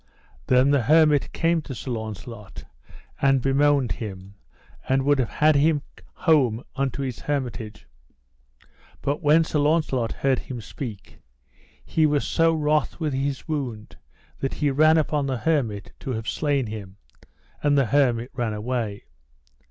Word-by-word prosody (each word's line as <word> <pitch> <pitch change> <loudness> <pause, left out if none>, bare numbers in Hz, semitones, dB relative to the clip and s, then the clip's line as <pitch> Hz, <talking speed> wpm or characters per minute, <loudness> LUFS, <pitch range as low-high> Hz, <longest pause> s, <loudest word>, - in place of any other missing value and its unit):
Then 130 +2 +4
the 140 -2 +3
hermit 150 +2 +4
came 165 0 +1
to 135 -3 -8
Sir 130 - -6
Launcelot 110 -1 -7 0.6
and 135 -1 +4
bemoaned 135 -2 +2
him, 95 -2 -7 0.6
and 135 0 +2
would 145 0 +3
have 125 - 0
had 155 0 +3
him 145 0 +3 0.3
home 130 -9 +2
unto 135 0 -2
his 130 -4 -4
hermitage; 125 -7 -4 1.2
but 145 +4 -1
when 155 +1 +5
Sir 155 -1 -1
Launcelot 145 -6 +1
heard 135 -2 0
him 125 -2 -7
speak, 110 -1 -8 0.7
he 155 -1 +2
was 145 -1 +1
so 165 0 +3
wroth 150 +1 0
with 155 -4 -1
his 135 0 -2
wound 125 -9 -4 0.4
that 135 - -2
he 145 -2 +1
ran 155 +3 +5
upon 150 -2 0
the 130 -2 -1
hermit 115 - -1
to 130 - -4
have 110 -1 -5
slain 145 -4 0
him, 105 -3 -8 0.6
and 145 -1 +3
the 135 - +4
hermit 125 -2 +1
ran 120 -4 -2
away. 110 -2 -3
135 Hz, 145 wpm, -24 LUFS, 115-150 Hz, 1.2 s, when